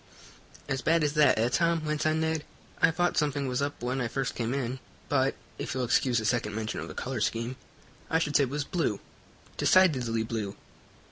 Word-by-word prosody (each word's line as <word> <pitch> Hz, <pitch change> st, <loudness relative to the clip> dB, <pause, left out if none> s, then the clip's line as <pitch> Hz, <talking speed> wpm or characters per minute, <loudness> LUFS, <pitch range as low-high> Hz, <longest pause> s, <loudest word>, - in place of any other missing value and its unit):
"As 135 Hz, -1 st, -1 dB
bad 165 Hz, 0 st, +3 dB
as 150 Hz, -1 st, +1 dB
that, 150 Hz, -6 st, +5 dB
eh, 115 Hz, +2 st, +3 dB
Tom?" 165 Hz, +4 st, +1 dB
went 150 Hz, 0 st, 0 dB
on 155 Hz, +1 st, +1 dB
Ned. 160 Hz, -1 st, 0 dB, 0.4 s
"I -, -, +6 dB
thought 175 Hz, +2 st, +1 dB
something 145 Hz, -2 st, 0 dB
was 125 Hz, +1 st, -1 dB
up 140 Hz, -3 st, -3 dB
when 125 Hz, +2 st, -1 dB
I 120 Hz, -, 0 dB
first 135 Hz, +2 st, -2 dB
came 115 Hz, -1 st, -2 dB
in, 130 Hz, -1 st, -2 dB, 0.3 s
but, -, -, +2 dB, 0.2 s
if -, -, -3 dB
you'll 130 Hz, -, 0 dB
excuse 120 Hz, 0 st, +2 dB
a 110 Hz, -, -4 dB
second 105 Hz, -2 st, 0 dB
mention 110 Hz, 0 st, -3 dB
of -, -, -5 dB
the -, -, -9 dB
color 130 Hz, -3 st, -3 dB
scheme, 115 Hz, +4 st, -1 dB, 0.5 s
I 160 Hz, -, +3 dB
should 150 Hz, -3 st, -1 dB
say 140 Hz, -, +5 dB
it -, -, -7 dB
was 145 Hz, +2 st, -2 dB
blue 155 Hz, -, -1 dB, 0.6 s
decidedly 125 Hz, -12 st, +3 dB
blue. 110 Hz, -3 st, -4 dB
135 Hz, 205 wpm, -28 LUFS, 120-155 Hz, 0.6 s, I